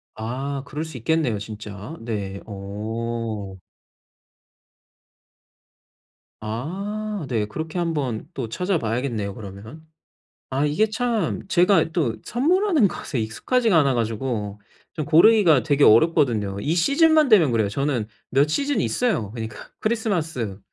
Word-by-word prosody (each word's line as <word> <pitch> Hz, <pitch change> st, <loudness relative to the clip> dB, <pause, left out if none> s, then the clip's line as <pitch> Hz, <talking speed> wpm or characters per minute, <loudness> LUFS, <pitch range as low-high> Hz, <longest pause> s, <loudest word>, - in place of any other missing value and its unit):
아 135 Hz, +5 st, -4 dB
그럴 150 Hz, +2 st, -4 dB
수 160 Hz, -6 st, -8 dB
있겠네요 135 Hz, -4 st, 0 dB
진짜. 105 Hz, +6 st, -8 dB
네. 100 Hz, -4 st, -4 dB
어. 110 Hz, 0 st, -5 dB, 2.9 s
아 195 Hz, -, -4 dB
네. 110 Hz, -4 st, 0 dB
그렇게 160 Hz, +10 st, -5 dB
한번 145 Hz, -10 st, -2 dB
또 120 Hz, -4 st, -4 dB
찾아 180 Hz, -, -1 dB
봐야겠네요 115 Hz, -4 st, -2 dB
그러면. 110 Hz, +10 st, -10 dB, 0.6 s
아 135 Hz, +3 st, 0 dB
이게 155 Hz, +9 st, +2 dB
참 220 Hz, -6 st, -1 dB
제가 180 Hz, -1 st, +3 dB
또 150 Hz, -10 st, 0 dB
선물하는 320 Hz, -, +3 dB
것에 135 Hz, -, -4 dB
익숙하지가 220 Hz, -, +1 dB
않아 140 Hz, -3 st, +3 dB
가지고 110 Hz, -3 st, -2 dB, 0.3 s
좀 155 Hz, -3 st, -3 dB
고르기가 165 Hz, -, +6 dB
되게 145 Hz, -2 st, +2 dB
어렵거든요. 110 Hz, -6 st, +3 dB
이 155 Hz, +10 st, -1 dB
시즌만 305 Hz, -, +4 dB
되면 175 Hz, -, +6 dB
그래요. 110 Hz, -3 st, +1 dB
저는 130 Hz, -1 st, -1 dB, 0.2 s
몇 140 Hz, +3 st, +3 dB
시즌이 285 Hz, -, 0 dB
있어요 170 Hz, -, 0 dB
그러니까. 110 Hz, -2 st, -7 dB
크리스마스, 165 Hz, -, -2 dB
140 Hz, 265 characters per minute, -23 LUFS, 110-180 Hz, 2.9 s, 고르기가